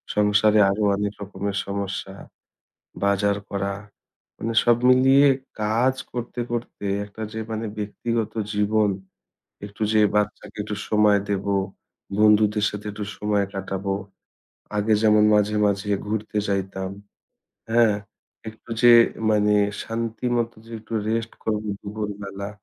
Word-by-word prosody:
সংসারে 105 +1 +4
আরও 100 +2 0
অনেক 105 0 -2
রকমের 100 0 -4
সমস্যা, 100 -1 -4 0.9
বাজার 100 0 +2
করা। 100 0 -2 0.6
মানে 115 +1 -3
সব 120 -1 +5
মিলিয়ে 135 +2 +6 0.3
কাজ 115 +5 +2 0.2
করতে, 120 0 -5
করতে 120 -3 -5 0.2
একটা 105 +2 -10
যে 110 - -5
মানে 110 0 -3
ব্যক্তিগত 110 +1 -2 0.2
জীবন, 105 0 +2 0.7
একটু 105 +1 -8
যে 110 - +4
বাচ্চাকে 105 0 -1
একটু 105 0 -4
সময় 105 -1 +4
দেব, 100 -1 -1 0.7
বন্ধুদের 105 0 +4
সাথে 105 0 -7
একটু 105 0 -5
সময় 105 -1 +1
কাটাব, 95 0 -4 0.9
আগে 105 +2 +1
যেমন 105 -1 +5
মাঝে, 105 0 +2
মাঝে 100 +1 -1 0.2
ঘুরতে 105 0 -2
যাইতাম, 95 -1 -2 0.8
হ্যাঁ? 115 -2 +4 0.5
একটু 110 +1 -13
যে 120 - +8 0.4
মানে 105 0 +3 0.3
শান্তি 115 +1 -4
মতো 120 0 -1
যে 115 - -12
একটু 110 +1 -14 0.2
রেস্ট 115 0 -1
করব 105 -1 -1 0.2
দুপুরবেলা। 100 -1 -5
105 Hz, 120 wpm, -23 LUFS, 100-110 Hz, 0.9 s, যে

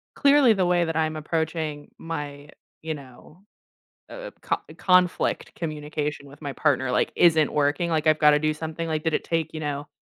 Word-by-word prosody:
"Clearly 280 -4 +5
the 190 -3 +1
way 175 -1 +2
that 165 -1 -3
I'm 155 -1 0
approaching 155 -1 -3
my" 145 -3 -6 0.3
you 160 0 -3
know, 140 +5 -14 0.7
uh - - -10 0.2
uh, - - -11
"co - - 0 0.2
conflict 180 -1 +2
communication 150 -2 -4
with 145 +1 -15
my 140 -1 -4
partner, 130 -1 +1
like, - - +1
isn't 160 -3 +4
working, 150 +4 +1
like, 160 -1 0
I've 155 0 +4
gotta 150 -1 +6
do 155 0 0
something." 160 +2 -5
Like, 155 -1 -1
did 160 -1 0
it - - -1
take, 165 -2 -1
you 155 - -4
know, 145 0 -4
155 Hz, 185 wpm, -25 LUFS, 150-165 Hz, 0.7 s, gotta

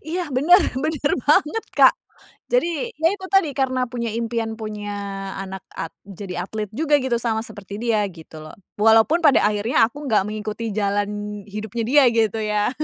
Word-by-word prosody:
Iya 350 -1 -2
bener 315 +9 +5 0.2
bener 300 -2 0
banget, 305 - +2
Kak. - - +7 0.5
Jadi, 470 0 0
ya 320 +2 +3
itu 380 -2 -6
tadi, 390 -6 +3
karena 260 -2 0
punya 235 -2 -3
impian 230 -1 -2
punya 210 -2 -6 0.5
anak 190 -1 -7
at 165 - -4 0.2
jadi 185 -2 -6
atlet 215 0 -4
juga 295 +5 +2
gitu, 255 -2 0
sama 225 -2 -1
seperti 200 -2 -9
dia 230 -3 +2
gitu 160 -3 -12
loh. 155 - -11 0.3
Walaupun 225 +9 +5
pada 295 -5 +5
akhirnya 210 +3 +2
aku 290 +5 -9
enggak 215 -5 +3
mengikuti 215 +1 -4
jalan 205 0 -2
hidupnya 215 +3 -5
dia 285 +3 +5
gitu 225 -2 +1
ya. 210 0 0
225 Hz, 165 wpm, -22 LUFS, 210-285 Hz, 0.5 s, Kak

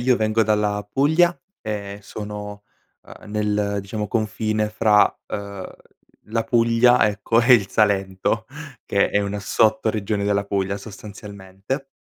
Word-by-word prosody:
io 125 0 +3
vengo 110 +1 +2
dalla 105 -1 0
Puglia 160 +6 +3 0.2
e 100 -2 -5
sono, 105 0 -7 0.4
ehm, - - -14
nel, 105 -1 0
diciamo, 105 +2 -4
confine 110 0 -1
fra, 105 -1 +3
ehm, 100 -2 -6 0.6
la 115 +1 -2
Puglia, 115 0 +4
ecco, 110 +3 +1
e 120 +2 +7
il 100 -5 +2
Salento, 100 +1 0 0.4
che 100 - +2
è 105 - +2
una 100 0 -3
sottoregione 110 -1 +1
della 100 0 +1
Puglia, 100 -1 -1
sostanzialmente. 100 +4 -8
105 Hz, 125 wpm, -22 LUFS, 100-110 Hz, 0.6 s, e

